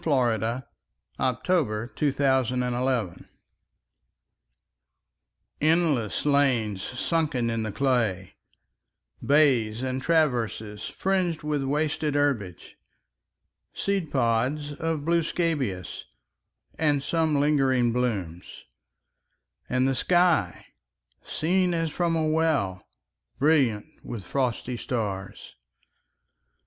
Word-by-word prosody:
Frederic 120 -4 +1 0.6
Manning 125 -3 0
THE 120 -11 0
TRENCHES 125 - 0 2.4
ENDLESS 155 - +1
lanes 130 -9 +2
sunken 130 - -1
in 115 0 -1
the 110 -1 -3
clay, 110 -7 0 0.9
Bays, 130 -6 +3
and 130 0 -2
traverses, 120 -10 0
fringed 185 -5 -1
with 150 -1 -1
wasted 150 +1 -1
herbage, 120 -12 -2 1.0
Seed 195 -5 -1
pods 130 +4 0
of 160 0 -3
blue 170 0 +3
scabious, 145 - -2 0.7
and 145 -3 +2
some 160 0 +1
lingering 135 -5 +2
blooms; 100 -9 -3 1.1
And 130 +1 +2
the 135 - +1
sky, 175 - +2 0.6
seen 180 +2 0
as 165 -2 -1
from 170 +1 0
a 160 -1 +1
well, 155 - +1 0.6
Brilliant 135 -8 +2 0.2
with 110 -5 -6
frosty 125 0 -2
stars. 100 -6 -4
135 Hz, 85 wpm, -26 LUFS, 115-155 Hz, 2.4 s, Bays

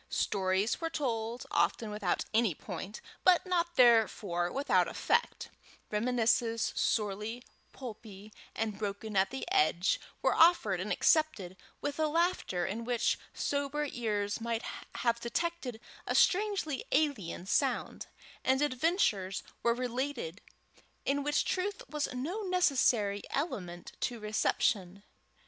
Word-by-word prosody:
Stories 190 - 0
were 330 - -1
told, 235 -5 -2
often 220 -2 +1
without 210 -4 -1
any 220 -6 +3
point, 200 +7 -7 0.2
but 365 0 +5
not 345 -1 0
therefore 210 -7 +4
without 280 +1 +2
effect; 470 +1 0 0.4
reminiscences, 230 +1 +1
sorely 215 +2 -1 0.3
pulpy 215 -4 -10 0.2
and 220 -2 -2
broken 210 0 -4
at 190 0 +3
the 265 - -5
edges, 290 - +3 0.2
were - - +4
offered 325 - +5
and 205 +3 -3
accepted 265 - +2 0.3
with 290 +1 -3
a 310 - +3
laughter 325 - 0
in 210 +6 -3
which 240 0 +1
sober 285 +1 -1
ears 210 -3 -2
might 230 0 -2 0.3
have 235 -1 +1
detected 250 0 -3 0.3
a - - 0
strangely 380 -8 +2
alien 265 - 0
sound; - - 0 0.4
and 265 +2 +3
adventures 255 - +1 0.2
were 235 0 +2
related 250 - -3 0.6
in 285 +1 +1
which 290 +1 +1
truth 390 +2 -2
was 300 -1 -2
no 300 +12 -3
necessary 260 - +2
element 180 - -4
to 240 -2 -2
reception. 205 -2 0
235 Hz, 120 wpm, -31 LUFS, 205-295 Hz, 0.6 s, but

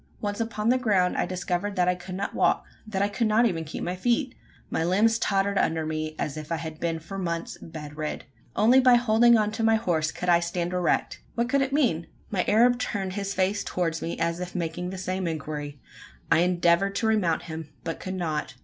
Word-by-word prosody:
Once 205 0 -3
upon 225 -1 -1
the 255 +1 +4
ground, 195 -7 +2
I - - 0
discovered 185 +2 -2
that 180 -1 +2
I 180 - +4
could 180 +1 -8
not 195 +1 -3
walk - - +2 0.2
that 200 -2 0
I - - +3
could 215 +2 0
not 220 +3 +4
even 170 -8 0
keep 155 - -6
my 180 - -2
feet! 245 +7 0 0.4
My - - 0
limbs 215 +6 +3
tottered 200 -1 +1
under 160 -1 +1
me, 155 0 -3
as 150 - -3
if 155 +1 -7
I - - +2
had 160 -1 -6
been 165 -1 -1
for 175 +5 -7
months 170 -2 -3
bed 150 -2 -8
rid. 155 -1 -4 0.3
Only 235 +5 +5
by 255 -1 +6
holding 235 0 +5
on 210 -1 +1
to 225 +1 -4
my 225 0 +5
horse 165 -8 0
could 180 - -6
I 170 -1 +5
stand 170 +1 -2
erect! 180 -2 0
What 235 +1 0
could 280 +1 +3
it 270 0 0
mean? 235 - +1 0.2
My 190 -3 +1
Arab 240 +3 +4
turned 195 -6 -2
his 200 0 -3
face 195 +2 +1
towards 165 -2 -2
me, 170 - -3
as 170 +1 -1
if 180 0 -6
making 175 +1 -3
the 190 - -6
same 185 0 -2
inquiry! 150 -2 -5 0.5
I - - +6
endeavoured 175 +2 +2
to 225 - 0
remount 185 -7 +2
him, 160 -2 -7
but 165 - -4
could 185 0 -5
not. 155 -6 -3
185 Hz, 220 wpm, -26 LUFS, 165-215 Hz, 0.5 s, by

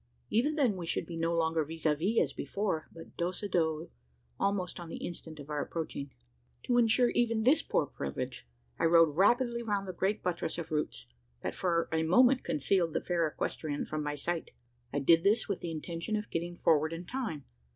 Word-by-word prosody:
Even 285 +8 +2
then 250 -10 +2
we 170 -2 -5
should - - -1
be 170 - -7
no 165 0 0
longer 160 -1 +2
vis 160 +2 -8
a 155 - +5
vis 190 +10 0
as - - +1
before, 195 -6 -2
but 165 0 -12
dos 175 +3 -2
a - - -1
dos, 160 -4 0 0.5
almost 195 -3 0
on 170 -1 -8
the - - -5
instant 160 -2 -7
of 145 +1 -9
our 150 -1 -1
approaching! 150 -4 -4 0.5
To 245 0 +3
insure 240 +1 +4
even 230 -2 +1
this 270 +7 +5
poor - - +1
privilege, 70 - -5 0.3
I - - +2
rode 165 -2 +5
rapidly 235 +6 +3
round 205 -4 -1
the 185 - -4
great 195 +4 -1
buttress 170 -2 -2
of 165 -2 -5
roots, 150 - -2 0.4
that - - -2
for 170 -2 0
a 160 0 +1
moment 250 +11 +5
concealed 165 +2 +1
the - - 0
fair 170 -2 +1
equestrian 150 -1 -3
from 155 0 -3
my 150 0 -2
sight. 170 +3 -2 0.4
I 145 - -2
did 165 +4 +5
this 205 +5 +3
with 200 -4 -2
the 170 - -4
intention 165 +5 -3
of 210 0 -4
getting 175 +1 -3
forward 155 -1 +3
in 170 +2 -6
time. 210 - -4
170 Hz, 205 wpm, -31 LUFS, 160-205 Hz, 0.5 s, a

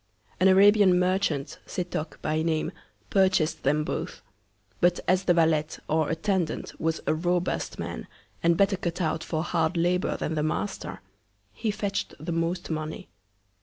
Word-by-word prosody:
An 185 - +5
Arabian 195 -1 +6
Merchant, 180 -6 0
Setoc 170 -4 -4
by 155 +1 0
Name, 160 -1 0 0.4
purchas'd 185 -5 +2
them 150 +3 +2
both; - - -4 0.6
but 175 0 +3
as 185 +1 +2
the 175 - +5
Valet, 160 -2 +3 0.2
or 155 -1 +1
Attendant, 170 +1 -1
was 160 0 0
a - - +2
robust 175 +2 -1
Man, - - -5 0.3
and 170 0 +3
better 195 0 +3
cut 170 -1 -3
out 160 -2 -1
for 160 -1 -2
hard 170 0 0
Labour 180 +2 +1
than 160 - -2
the 155 - 0
Master, 175 +6 -3 0.5
he 215 - -2
fetch'd 205 -1 -2
the 160 +4 -4
most 165 +1 -1
Money. 155 - -4
170 Hz, 150 wpm, -27 LUFS, 160-185 Hz, 0.6 s, Arabian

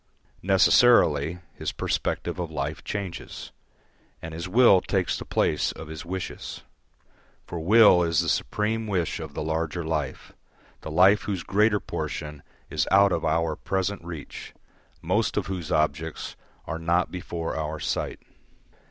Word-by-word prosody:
Necessarily, 90 - +4 0.2
his - - -4
perspective - - -2
of 85 -2 -3
life 75 -1 -4
changes, 100 -4 -6 0.7
and 80 0 -8
his 85 +3 -5
will 110 -3 +6
takes - - 0
the - - -6
place - - +1
of 80 - -10
his 80 -1 -7
wishes. 95 +1 -6 0.8
For 85 - -6
will 100 +1 +6
is 85 -1 +2
the 85 - -3
supreme 110 +6 -1
wish 90 -5 -1
of 80 -3 -8
the - - -3
larger 80 +2 -2
life, 75 -4 -3 0.5
the - - -7
life 95 +6 +5
whose 95 -4 -3
greater 105 +1 +2
portion 75 -5 -5 0.3
is 75 -2 -1
out 100 +1 +6
of 85 - -1
our 80 0 +1
present 95 +2 -2
reach, 85 -4 -8 0.5
most - - 0
of - - 0
whose 90 -3 -5
objects 75 +1 -1 0.3
are 80 - -4
not 85 +2 +1
before 85 -2 -4
our 80 0 -3
sight. - - -3
85 Hz, 145 wpm, -26 LUFS, 80-95 Hz, 0.8 s, will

